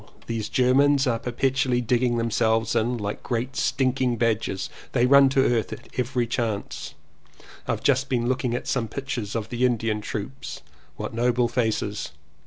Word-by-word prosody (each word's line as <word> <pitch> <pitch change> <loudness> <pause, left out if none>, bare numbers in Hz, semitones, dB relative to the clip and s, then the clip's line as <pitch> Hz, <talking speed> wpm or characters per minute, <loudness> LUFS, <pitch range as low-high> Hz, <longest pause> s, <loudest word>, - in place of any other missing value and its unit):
These 115 -2 -3
Germans 135 +2 +4
are 115 -3 +1
per 125 - -4
petually 130 -1 +1
digging 120 0 +2
themselves 115 0 +1
in. 120 +2 +1
Like 105 -1 -4
great 125 +2 -3
stinking 130 -3 +1
badgers 110 -4 0 0.3
they 120 - +3
run 140 +1 +7
to 135 0 +3
earth 115 -3 +1
at - - -9
every 125 -1 0
chance. 115 -3 -3 0.7
I've - - -2
just 135 0 +2
been 120 -2 0
looking 125 -1 0
at - - -4
some 120 -4 0
pictures 120 -4 -4
of 110 -2 -3
the 120 +1 -2
Indian 115 -3 +1
troops. 110 +6 -6 0.3
What - - -5
noble 120 +1 +2
faces! 110 -7 -1
120 Hz, 160 wpm, -25 LUFS, 115-130 Hz, 0.7 s, run